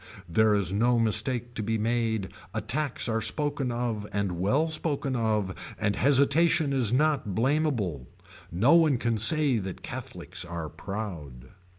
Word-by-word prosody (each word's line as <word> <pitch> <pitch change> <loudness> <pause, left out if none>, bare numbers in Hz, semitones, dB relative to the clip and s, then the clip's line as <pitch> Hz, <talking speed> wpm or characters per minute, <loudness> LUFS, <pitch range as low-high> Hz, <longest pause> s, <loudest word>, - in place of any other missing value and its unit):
There 105 +5 +3
is 95 -2 -1
no 120 +4 +2
mistake 115 +2 +2
to 110 - -4
be 110 +1 -1
made 110 -2 -1 0.2
attacks 145 -2 0
are 115 -1 -1
spoken 145 +2 -1
of 120 -3 -3
and 100 -4 -2
well 130 - +1
spoken 150 -4 -2
of 110 -5 -2
and 105 -2 0
hesitation 145 +2 +3
is 125 -5 +1
not 140 -7 +1
blameable. 115 - 0 0.4
No 110 - +3
one 160 -5 +4
can 115 -2 -1
say 140 +1 +3
that 95 -2 -7
Catholics - - -5
are 85 -2 -6
proud. 80 - -7
115 Hz, 145 wpm, -27 LUFS, 100-140 Hz, 0.4 s, one